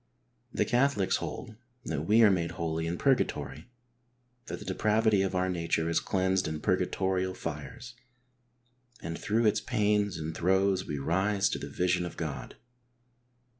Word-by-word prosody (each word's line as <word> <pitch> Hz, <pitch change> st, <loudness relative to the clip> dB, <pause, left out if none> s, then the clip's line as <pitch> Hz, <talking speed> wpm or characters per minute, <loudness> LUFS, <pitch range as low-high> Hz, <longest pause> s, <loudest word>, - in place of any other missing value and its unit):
The -, -, 0 dB
Catholics 125 Hz, -6 st, +2 dB
hold 110 Hz, 0 st, -6 dB, 0.3 s
that 80 Hz, 0 st, -3 dB
we 110 Hz, +3 st, +6 dB
are 105 Hz, -, +7 dB
made 85 Hz, -3 st, 0 dB
holy 80 Hz, 0 st, -2 dB
in 85 Hz, +1 st, -2 dB
purgatory; 105 Hz, -, 0 dB, 0.8 s
that -, -, -4 dB
the -, -, -10 dB
depravity 110 Hz, -1 st, +2 dB
of 95 Hz, -1 st, -1 dB
our 90 Hz, 0 st, +1 dB
nature 85 Hz, -2 st, -1 dB
is -, -, +3 dB
cleansed 95 Hz, 0 st, 0 dB
in 80 Hz, 0 st, -3 dB
purgatorial 95 Hz, 0 st, 0 dB
tires, 75 Hz, -, -7 dB, 1.1 s
and 85 Hz, 0 st, -4 dB
through 110 Hz, +6 st, 0 dB
its 105 Hz, -, +3 dB
pains 105 Hz, -6 st, +1 dB
and 80 Hz, 0 st, -5 dB
throes 95 Hz, +1 st, +2 dB
we 75 Hz, -, -3 dB
rise 95 Hz, +7 st, +1 dB
to -, -, -3 dB
the -, -, -6 dB
vision 90 Hz, 0 st, +1 dB
of 85 Hz, -, -6 dB
God. 75 Hz, -4 st, -5 dB
95 Hz, 150 wpm, -29 LUFS, 85-105 Hz, 1.1 s, are